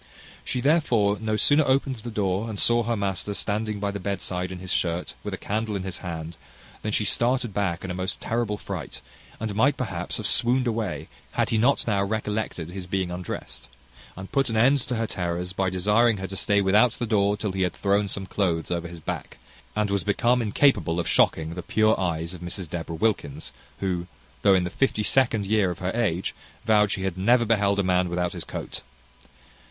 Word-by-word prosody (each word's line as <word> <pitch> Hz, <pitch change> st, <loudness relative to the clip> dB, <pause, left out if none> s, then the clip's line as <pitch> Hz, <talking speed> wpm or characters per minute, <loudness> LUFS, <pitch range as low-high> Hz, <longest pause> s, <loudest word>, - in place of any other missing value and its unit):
She 125 Hz, -, -2 dB
therefore 120 Hz, -9 st, +3 dB
no 110 Hz, -1 st, 0 dB
sooner 145 Hz, +7 st, +5 dB
opened 135 Hz, -1 st, +1 dB
the 115 Hz, +2 st, -7 dB
door, 105 Hz, 0 st, -1 dB
and 105 Hz, -3 st, -4 dB
saw 120 Hz, 0 st, +4 dB
her 115 Hz, 0 st, -1 dB
master 100 Hz, 0 st, -2 dB
standing 105 Hz, 0 st, -1 dB
by 100 Hz, 0 st, -1 dB
the 100 Hz, -, -5 dB
bedside 90 Hz, -2 st, -3 dB
in 95 Hz, -, -5 dB
his 90 Hz, -1 st, -7 dB
shirt, 85 Hz, 0 st, 0 dB
with -, -, -4 dB
a -, -, -3 dB
candle 110 Hz, +1 st, -2 dB
in 95 Hz, -, -3 dB
his 95 Hz, -2 st, -4 dB
hand, 80 Hz, -2 st, -6 dB, 0.4 s
than 105 Hz, -, -2 dB
she 105 Hz, -, +1 dB
started 120 Hz, -1 st, +2 dB
back 95 Hz, -4 st, -1 dB
in 95 Hz, -, -4 dB
a -, -, -2 dB
most 95 Hz, +1 st, -3 dB
terrible 115 Hz, -3 st, -1 dB
fright, -, -, -6 dB, 0.4 s
and 110 Hz, -1 st, -3 dB
might 130 Hz, +7 st, +3 dB
perhaps 95 Hz, -8 st, -3 dB
have -, -, -4 dB
swooned 125 Hz, +2 st, +3 dB
away, 115 Hz, -2 st, -2 dB, 0.3 s
had -, -, 0 dB
he 110 Hz, -, +2 dB
not 135 Hz, +5 st, +3 dB
now 100 Hz, -3 st, +1 dB
recollected 105 Hz, -4 st, -2 dB
his 90 Hz, -1 st, -7 dB
being 95 Hz, -1 st, -1 dB
undrest, 80 Hz, -8 st, -6 dB, 0.5 s
and 95 Hz, 0 st, -8 dB
put 135 Hz, -2 st, +2 dB
an 110 Hz, -, -1 dB
end 135 Hz, +6 st, +5 dB
to 125 Hz, 0 st, -3 dB
her 115 Hz, 0 st, 0 dB
terrors 90 Hz, -2 st, -3 dB
by 95 Hz, 0 st, 0 dB
desiring 105 Hz, +5 st, +3 dB
her 95 Hz, -, -4 dB
to 95 Hz, +1 st, -6 dB
stay 100 Hz, +1 st, +2 dB
without 105 Hz, +5 st, +4 dB
the 120 Hz, -, -2 dB
door 105 Hz, -2 st, +2 dB
till 105 Hz, -1 st, -2 dB
he 95 Hz, 0 st, -3 dB
had 90 Hz, -2 st, +1 dB
thrown 100 Hz, +1 st, +1 dB
some 100 Hz, 0 st, -4 dB
cloathes 90 Hz, -4 st, -1 dB
over 85 Hz, -1 st, -1 dB
his 85 Hz, -1 st, -10 dB
back, -, -, -5 dB, 0.4 s
and 105 Hz, -1 st, 0 dB
was 100 Hz, -1 st, +1 dB
become 120 Hz, +4 st, +2 dB
incapable 105 Hz, -, +2 dB
of 85 Hz, -, -2 dB
shocking 80 Hz, +1 st, +2 dB
the 90 Hz, -, -5 dB
pure 110 Hz, +4 st, +2 dB
eyes 85 Hz, -2 st, -2 dB
of 90 Hz, -, -9 dB
Mrs 90 Hz, +1 st, -4 dB
Deborah 80 Hz, +1 st, -5 dB
Wilkins, 95 Hz, -6 st, -1 dB, 0.3 s
who, 90 Hz, -3 st, -1 dB, 0.3 s
though 100 Hz, -2 st, +5 dB
in 90 Hz, -, +2 dB
the 90 Hz, -, -3 dB
fifty 110 Hz, -2 st, +1 dB
second 115 Hz, -3 st, +3 dB
year 105 Hz, -2 st, +2 dB
of 90 Hz, -, -4 dB
her 95 Hz, 0 st, -2 dB
age, 100 Hz, -7 st, 0 dB, 0.3 s
vowed 105 Hz, -2 st, +4 dB
she 95 Hz, -, -2 dB
had 95 Hz, -1 st, -2 dB
never 120 Hz, +5 st, +4 dB
beheld 100 Hz, -3 st, +2 dB
a -, -, +3 dB
man 90 Hz, -1 st, +2 dB
without 90 Hz, 0 st, -1 dB
his -, -, -4 dB
coat. -, -, -6 dB
100 Hz, 210 wpm, -25 LUFS, 90-110 Hz, 0.5 s, sooner